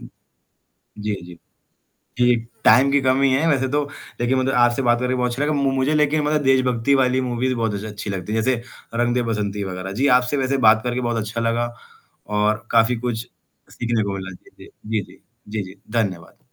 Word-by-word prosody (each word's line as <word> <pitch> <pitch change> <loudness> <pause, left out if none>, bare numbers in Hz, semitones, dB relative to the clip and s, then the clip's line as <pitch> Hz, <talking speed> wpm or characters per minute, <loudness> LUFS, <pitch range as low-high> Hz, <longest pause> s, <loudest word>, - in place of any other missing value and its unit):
उम, - - -11 0.9
जी, 105 0 -2
जी। 90 -1 -12 0.8
जी, 125 0 +4 0.3
time 130 +5 +6
की 140 - +4
कमी 130 +1 +3
है 145 +5 +2
वैसे 135 -4 +2
तो 145 0 +1 0.4
लेकिन 130 +2 +2
मतलब 130 +1 0
आपसे 120 +2 +2
बात 120 -1 +2
करके 125 0 0
बहुत 125 -1 0
अच्छा 130 +4 -2
लगा। 150 +1 +1
मु 140 -2 +1
मुझे 135 +3 +1
लेकिन 150 0 +2
मतलब 150 0 +1
देशभक्ति 130 0 +2
वाली 130 0 +2
मूवीज़ 125 +2 -1
बहुत 115 -3 -1
अच्छ 100 - -4
अच्छी 105 0 -7
लगती 95 +1 -4
हैं। 110 - +1
जैसे 125 0 0 0.4
रंग 120 0 +2
दे 125 - +2
बसंती 105 -1 -2
वग़ैरह। 95 0 -5
जी, 140 - +4
आपसे 125 +3 -1
वैसे 135 +1 0
बात 110 0 +6
करके 125 +1 -1
बहुत 120 -1 -1
अच्छा 110 +2 -3
लगा 120 +1 0 0.5
और 105 +2 0
काफ़ी 115 +1 +3
कुछ 120 0 -3 0.4
सीखने 120 -2 -1
को 100 -1 -2
मिला। 95 -1 -6
जी, - - -18
जी। - - -11 0.2
जी, 110 0 0
जी। - - -16 0.3
जी, 105 -1 -3
जी। 95 +1 -10 0.2
धन्यवाद। 95 -6 -3
120 Hz, 205 wpm, -21 LUFS, 110-130 Hz, 0.9 s, time